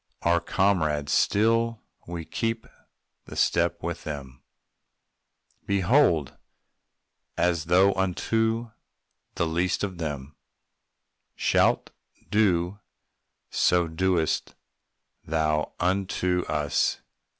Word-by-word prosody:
Our 85 0 +3
comrades 80 -7 +1
still; 115 +2 +2 0.2
we 85 -1 -5
keep 115 +3 -2 0.6
the - - -10
step 85 0 +1
with 85 0 -4
them, 70 -4 -7 1.3
_Behold! 95 - +2 1.0
As 85 -2 +1
thou 95 +2 +4
unto 110 +5 0 0.6
the - - +1
least 85 +5 0
of 95 -4 -4
them 75 -3 -5 1.0
Shalt - - +2 0.4
do, 95 -2 +2 0.7
so 90 -1 +3
dost 85 0 0 0.7
thou 75 -1 0
unto 90 -1 0
us. 75 -1 0
90 Hz, 85 wpm, -26 LUFS, 80-100 Hz, 1.3 s, thou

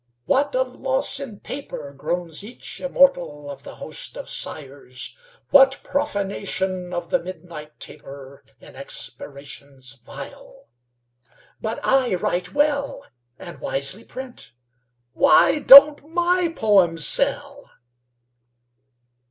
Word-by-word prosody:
"What 280 - +1
a 260 - +3
loss 265 +2 -1
in 240 -8 -8
paper," 155 - -7
Groans 170 +4 -3
each 235 +4 -9
immortal 170 - +2
of 140 - -10
the - - -10
host - - -8
of - - -7
sighers! 135 -3 -6 0.4
"What 270 -1 +6
profanation 195 -8 -2
of 175 -1 -5
the - - +3
midnight 170 -4 -10
taper 135 0 -10 0.2
In - - -15
expirations 140 -2 -7
vile! - - -11 0.9
But 220 +1 -4
I 260 -7 +3
write 180 0 -2
well, 285 -1 0 0.3
And - - -10
wisely 140 +11 -3
print. 255 - -9 0.6
Why 310 +1 +5
don't 290 +1 +9
my 350 +1 +2
poems 190 - +2
sell?" 280 0 -1
205 Hz, 105 wpm, -22 LUFS, -, 0.9 s, don't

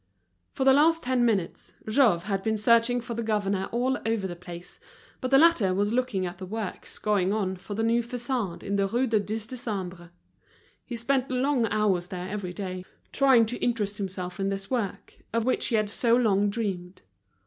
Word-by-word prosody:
For - - -2
the 265 0 +6
last 325 +4 +4
ten 250 -1 +1
minutes, 200 -7 -1
Jouve 215 -7 +3
had 195 -1 -2
been 220 +1 0
searching 235 +3 +3
for 240 0 -6
the 235 - -3
governor 205 -3 -1
all 255 +3 0
over 225 -3 0
the 175 -2 -4
place; 175 0 -10 0.4
but 255 - -3
the 270 - +6
latter 270 - +4
was 205 +3 +1
looking 245 -7 0
at 175 0 -6
the 190 - -6
works 215 -1 -5
going 200 -3 +1
on 195 -3 -1
for 200 +3 -8
the 225 - -1
new 230 +1 +3
façade 240 -5 -3
in 200 0 -1
the 200 0 +2
Rue 240 +6 +1
du 225 -4 +2
Dix 210 +2 -4
Décembre. 190 -8 -5 0.7
He 245 - -6
spent 260 +3 0
long 255 -1 +1
hours 195 -5 +1
there 180 -1 -5
every 195 -2 -4
day, 185 -1 -5 0.3
trying 265 -4 +5
to 240 +3 -3
interest 210 -4 0
himself 185 -1 -5
in 195 0 0
this 195 +2 -5
work, 230 -7 -3
of 230 0 +1
which 255 - +1
he 235 - +1
had 215 -1 +2
so 230 +3 +2
long 205 -4 +3
dreamed. 195 - -4
215 Hz, 195 wpm, -27 LUFS, 195-240 Hz, 0.7 s, the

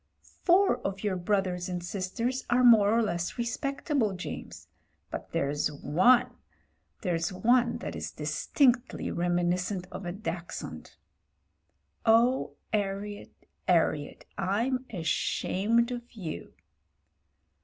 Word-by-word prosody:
"Four 375 +3 +4
of 195 +1 -4
your 205 -3 0
brothers 185 -1 0
and 180 -1 -3
sisters 210 +8 -2
are 250 +1 +4
more 220 -4 +7
or 230 +1 +3
less 175 -2 -2
respectable, 250 -1 -1
James, 180 - -7 0.4
but - - -6
there's 145 +2 0
one 185 - +3 0.3
— - - -43
there's 170 -3 0
one 235 +6 +3
that - - -5
is - - -5
distinctly 255 -3 +1
reminiscent 175 +2 0
of 185 0 -6
a - - -2
dachshund. 180 -3 -6 1.1
Oh! 235 +3 +3 0.2
'Arriet, 205 0 -3 0.2
'Arriet 160 -4 +1
— - - -37 0.2
I'm 255 +2 -1
ashamed 205 +6 +1
of 240 0 -6
you." 185 -9 -6
205 Hz, 110 wpm, -29 LUFS, 180-240 Hz, 1.1 s, more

